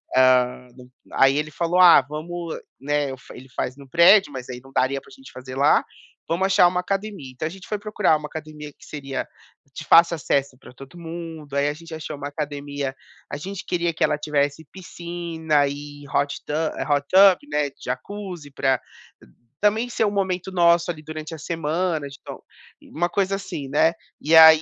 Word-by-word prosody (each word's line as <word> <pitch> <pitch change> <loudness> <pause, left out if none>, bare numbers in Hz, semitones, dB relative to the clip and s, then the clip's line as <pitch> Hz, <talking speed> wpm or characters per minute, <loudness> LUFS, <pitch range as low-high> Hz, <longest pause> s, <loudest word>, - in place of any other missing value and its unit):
hã, 125 -1 +3
da 125 0 -14 0.4
aí 135 +1 +5
ele 150 0 -2
falou: 170 +4 0
"Ah, 180 -5 +9
vamos", 160 +4 -6 0.2
né, 145 0 0
eu 130 - -7
fa 125 - -14
ele 130 +1 -12
faz 130 0 -3
no 140 -1 -13
prédio, 180 +6 +6
mas 130 -1 -8
aí 125 -1 -7
não 135 - -16
daria 135 +1 0
pra - - -19
a - - -19
gente 270 -1 -14
fazer 130 0 -9
lá, 140 +2 +4 0.4
"Vamos 170 +3 0
achar 190 -2 +5
uma 180 +1 0
academia", 195 -7 -4
então 130 - -5
a - - -4
gente 190 0 -12
foi 210 - -2
procurar 210 -5 +2
uma 150 0 -7
academia 150 -1 -8
que - - -19
seria 135 -3 -5 0.5
de 155 - -7
fácil 170 +1 +6
acesso 140 -4 -1
para 130 - -15
todo 135 +6 -13
mundo. 165 -3 -8
Aí 140 +1 +2
a 145 - 0
gente 165 +2 -12
achou 155 -1 -6
uma 145 0 -5
academia 145 -2 -4 0.4
a - - -3
gente 190 +5 -7
queria 170 -1 -1
que - - -1
ela 150 -1 +2
tivesse 145 0 -1
piscina 170 -5 -2
e 145 +1 -8
hot 140 0 0
tu - - -5 0.4
hot 145 0 +2
tub, 190 -1 +7
né, 150 -1 +1
jacuzzi, 175 +3 -6
pra 135 -2 +1 0.8
também 215 +4 +2
ser 225 - 0
um 205 - 0
momento 190 -2 -2
nosso, 170 -1 +3
ali, 155 -2 -10
durante 155 +1 -7
a - - -10
semana 165 0 -2
de 140 0 -11
então - - -9 0.4
uma 175 +3 -2
coisa 195 +1 0
assim, 155 -8 -6
né, 160 +4 +3 0.3
e 155 - 0
aí, 160 -1 +10
155 Hz, 195 wpm, -23 LUFS, 140-175 Hz, 0.8 s, aí